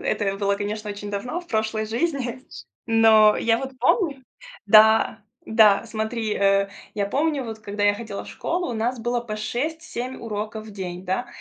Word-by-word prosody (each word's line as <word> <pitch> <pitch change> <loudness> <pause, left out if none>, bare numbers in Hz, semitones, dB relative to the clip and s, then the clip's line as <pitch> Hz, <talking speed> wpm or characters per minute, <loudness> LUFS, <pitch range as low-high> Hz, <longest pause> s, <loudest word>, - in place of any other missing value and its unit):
это 195 -2 -1
было, 200 0 0
конечно, 210 +1 -4
очень 205 0 -7
давно, 245 - -3
в 350 - -17
прошлой 220 -3 -1
жизни. 255 0 -2 0.5
Но 220 -2 +6
я 225 0 +2
вот 265 +1 -5
помню 290 - +1 0.4
Да, 220 0 +5 0.2
да, 220 -1 +5
смотри, 220 0 -2
э, 195 0 +2 0.3
я 205 -1 -1
помню 285 +4 0
вот, 220 -2 -7
когда 205 0 -3
я 205 - +4
ходила 205 -2 -6
в - - -12
школу, 350 -3 -3
у 235 - -4
нас 235 +3 -1
было 240 +1 -1
по 215 -3 -6
6-7 255 +2 -4
уроков 215 0 -5
в - - -10
день, 180 -2 -6
да. 190 +7 -2
220 Hz, 175 wpm, -23 LUFS, 205-245 Hz, 0.5 s, Но